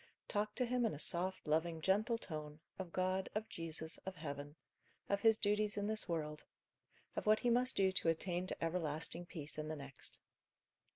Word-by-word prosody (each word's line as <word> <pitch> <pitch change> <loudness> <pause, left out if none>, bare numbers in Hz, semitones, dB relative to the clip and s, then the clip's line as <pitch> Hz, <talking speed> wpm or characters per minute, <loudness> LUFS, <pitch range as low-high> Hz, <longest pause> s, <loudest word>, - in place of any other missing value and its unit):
Talk 210 0 0
to 250 - +2
him 250 0 +1
in 220 -8 +1
a - - -6
soft, 175 +3 0
loving, 160 +2 +2
gentle 210 +7 +3
tone, 155 -7 -6 0.2
of 185 -3 -4
God, 185 +1 +1
of 215 +1 -1
Jesus, 160 -1 -3
of 190 0 -6
heaven; 145 -3 -5 0.5
of 200 0 +1
his 225 0 +6
duties 210 0 +2
in 205 - 0
this 215 -2 -1
world; 150 -2 -2 0.7
of - - -2
what 215 0 +6
he 240 - +3
must 250 +2 +4
do 190 -1 +4
to 185 -3 +2
attain 175 +2 0
to - - -3
everlasting 165 0 0
peace 155 -3 -2
in 155 - -3
the 155 - -2
next. 140 -2 -5
180 Hz, 185 wpm, -38 LUFS, 155-210 Hz, 0.7 s, his